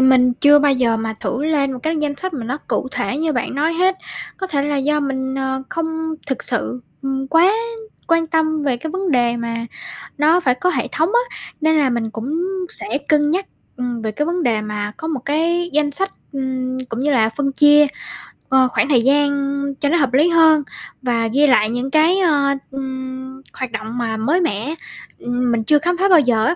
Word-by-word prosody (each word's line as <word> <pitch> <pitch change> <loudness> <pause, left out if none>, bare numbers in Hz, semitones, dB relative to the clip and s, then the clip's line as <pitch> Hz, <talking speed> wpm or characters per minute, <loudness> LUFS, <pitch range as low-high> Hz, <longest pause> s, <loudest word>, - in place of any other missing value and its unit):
mình 255 -1 +5
chưa 290 0 +7
bao 290 -1 +3
giờ 245 -4 +1
mà 225 0 -3
thử 275 +5 -2
lên 285 -4 +1
một 255 - -6
cái 320 +1 -1
danh 295 -1 -1
sách 375 +3 -4
mà 245 -6 -4
nó 255 +5 -3
cụ - - -1
thể 255 0 -2
như 315 +1 0
bạn 245 -2 -2
nói 305 +4 +1
hết, 370 +2 +2 0.4
có 380 - -4
thể 290 -6 -1
là 290 0 -1
do 300 +2 +1
mình, 265 -2 -2
ờ, 265 0 -2
không 320 -1 -3
thực 265 -2 -3
sự, 250 +1 0 0.2
ừm, 270 0 -2
quá 335 +6 +5 0.5
quan 330 -1 +2
tâm 315 -1 0
về 270 -4 0
cái 310 +6 -6
vấn 380 +1 -2
đề 240 -3 +2
mà 230 0 -4 0.5
nó 310 +4 +4
phải 255 -8 +1
có 360 +8 0
hệ - - -1
thống 320 +3 +1
á. 485 +1 0 0.3
Nên 315 +1 +3
là 285 -3 +3
mình 235 -2 -1
cũng 235 +8 -4 0.3
sẽ 390 -7 -3
cân 295 -1 +3
nhắc, 380 +4 0 0.3
ừm, 245 -2 -3
về 220 -1 -2
cái 295 +8 -2
vấn 345 +1 -1
đề 225 -5 +1
mà 210 -1 -4
có 320 - -5
một 310 -4 -2
cái 335 +4 0
danh 295 -1 +2
sách, 390 +6 0 0.2
ừm, 260 -1 -3
cũng 230 - -4
như 290 +3 +1
là 225 -4 +3
phân 275 +4 -2
chia, 295 +1 +6 0.6
ờ, 260 -1 +4
khoảng 250 - 0
thời 255 -5 +4
gian 285 +2 +3 0.5
cho 285 - +1
nó 345 - +3
hợp 265 -5 +1
lý 300 +6 +4
hơn, 320 -3 +5 0.4
và 235 -3 0
ghi 285 +6 +3
lại 215 -5 +4
những 245 +3 -3
cái, 320 +5 +4
ơ, 290 -6 +2 0.2
ừm, 260 0 -6
hoạt 260 -2 -5
động 220 +2 -5
mà 225 -2 -2
mới 295 +12 +1
mẻ, 275 - -2 0.4
ừm, 245 0 -1
mình 230 -1 0
chưa 295 +4 +4
khám 350 +2 0
phá 390 +2 +2
bao 355 -3 +7
giờ 235 -5 +2
á, 340 - +2
280 Hz, 215 wpm, -19 LUFS, 250-315 Hz, 0.6 s, chưa